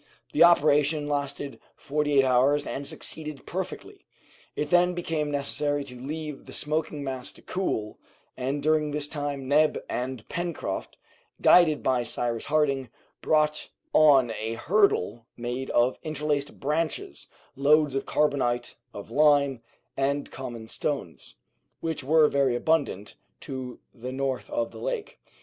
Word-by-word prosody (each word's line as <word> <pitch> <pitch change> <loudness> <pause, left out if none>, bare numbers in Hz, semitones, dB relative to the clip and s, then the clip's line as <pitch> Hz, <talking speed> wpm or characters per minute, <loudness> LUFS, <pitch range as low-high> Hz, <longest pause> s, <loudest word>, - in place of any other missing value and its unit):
The - - +6
operation 150 -2 +4
lasted 140 -1 -3 0.2
forty 150 0 0
eight 135 - +6
hours, 135 +3 +3
and 140 0 -4
succeeded 155 -3 -5
perfectly. - - -6 0.5
It 150 0 -3
then 180 0 +4
became 160 -4 -2
necessary 145 0 -1
to 130 -2 -10
leave 150 +1 -6
the - - -10
smoking 150 -1 -2
mass 130 -2 -5
to - - -17
cool, 110 - -3 0.4
and 135 +3 -2
during 155 0 +2
this 145 0 -2
time 145 -3 -4
Neb 150 +3 +4
and 125 -2 -4
Pencroft, 175 -1 -4 0.4
guided 160 -4 +5
by 130 -2 +2
Cyrus 115 -1 -2
Harding, 140 -4 +1 0.3
brought, 150 -1 +1 0.2
on 140 -6 +6
a 110 +1 -3
hurdle 135 - +1
made 120 +2 -4
of 120 +2 +2
interlaced 150 -2 -2
branches, 150 - -2 0.3
loads 145 +1 +4
of 135 - -2
carbonate 125 -5 0 0.2
of 100 +2 -8
lime 140 -2 +4 0.3
and 140 +1 -1
common 120 -4 -7
stones, 135 - -4 0.4
which 160 -4 -3
were 155 +2 +5
very 140 -4 +2
abundant, 135 -8 0 0.2
to 130 -2 -6
the 125 +1 -7
north 135 - -2
of 295 0 -1
the - - -10
lake. - - -4
145 Hz, 135 wpm, -27 LUFS, 130-155 Hz, 0.5 s, The